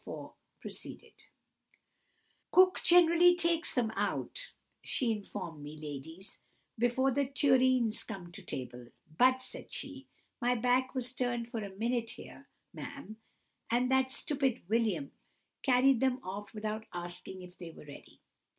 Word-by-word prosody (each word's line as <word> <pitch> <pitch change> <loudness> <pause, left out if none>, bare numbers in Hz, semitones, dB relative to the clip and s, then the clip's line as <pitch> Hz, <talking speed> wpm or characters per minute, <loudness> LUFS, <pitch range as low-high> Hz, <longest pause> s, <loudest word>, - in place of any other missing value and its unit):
4 - - -8 0.3
proceeded:— - - -7 1.2
"Cook 370 0 +6
generally 350 0 +7
takes 340 -1 +1
them 235 -4 +1
out, - - -2 0.3
she 245 -3 0
informed 175 -7 -5
me, 150 +1 -8
ladies, 155 +5 -8 0.4
before 245 +3 +2
the 280 +1 +1
tureens 260 -4 +3
come 190 -6 -7
to 185 - -9
table; 125 -7 -6 0.3
'but,' 255 +5 +4
said - - -10
she, - - -6 0.3
'my 245 +1 +3
back 250 +3 +2
was 250 -1 -1
turned 240 -2 -1
for 230 -3 -3
a 200 - -5
minute 230 +2 -1
here, - - -11 0.2
ma'am, 280 -6 -8 0.5
and 245 +2 +2
that 265 0 +3
stupid 265 -2 0
William 230 +6 +1 0.5
carried 260 -1 +4
them 260 0 +2
off 200 +2 -6
without 215 0 -4
asking 175 +1 -7
if 180 0 -12
they 175 -2 -7
were 160 - -13
ready. 145 - -13
240 Hz, 135 wpm, -32 LUFS, 200-265 Hz, 1.2 s, generally